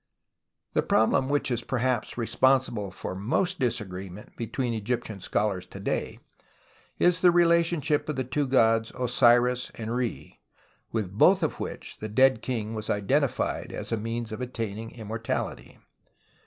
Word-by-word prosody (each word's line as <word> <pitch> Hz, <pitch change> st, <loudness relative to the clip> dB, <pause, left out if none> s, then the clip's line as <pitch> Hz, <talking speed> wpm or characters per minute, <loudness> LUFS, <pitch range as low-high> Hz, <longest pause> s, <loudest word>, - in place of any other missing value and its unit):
The -, -, +3 dB
problem 110 Hz, +4 st, +2 dB
which 145 Hz, -2 st, 0 dB
is 120 Hz, -1 st, 0 dB
perhaps 125 Hz, -2 st, -1 dB
responsible 120 Hz, -2 st, +2 dB
for 95 Hz, -, -6 dB
most 145 Hz, -, 0 dB
disagreement 100 Hz, -5 st, -4 dB
between 120 Hz, +1 st, -2 dB
Egyptian 110 Hz, -1 st, -3 dB
scholars 95 Hz, 0 st, -1 dB
to -, -, -10 dB
day -, -, -2 dB, 0.8 s
is 175 Hz, -1 st, +3 dB
the 180 Hz, -, +6 dB
relationship 170 Hz, -4 st, +3 dB
of 150 Hz, -, -1 dB
the 130 Hz, -, -1 dB
two 135 Hz, +3 st, -1 dB
gods 115 Hz, -3 st, +3 dB
Osiris 125 Hz, 0 st, +3 dB
and 115 Hz, +1 st, -4 dB
Re, 125 Hz, -2 st, -4 dB, 0.5 s
Mith 105 Hz, -5 st, -2 dB
both 100 Hz, -, +4 dB
of -, -, -1 dB
which -, -, -6 dB
the 110 Hz, -, -5 dB
dead 130 Hz, +1 st, +4 dB
king 115 Hz, -4 st, -3 dB
was 110 Hz, -1 st, -5 dB
identified 130 Hz, +7 st, 0 dB
as -, -, -6 dB
a -, -, +2 dB
means 115 Hz, +1 st, -4 dB
of 110 Hz, -, -5 dB
attain 115 Hz, -4 st, -4 dB
ing 115 Hz, 0 st, -6 dB
immortality. 110 Hz, 0 st, -4 dB
120 Hz, 145 wpm, -27 LUFS, 110-130 Hz, 0.8 s, the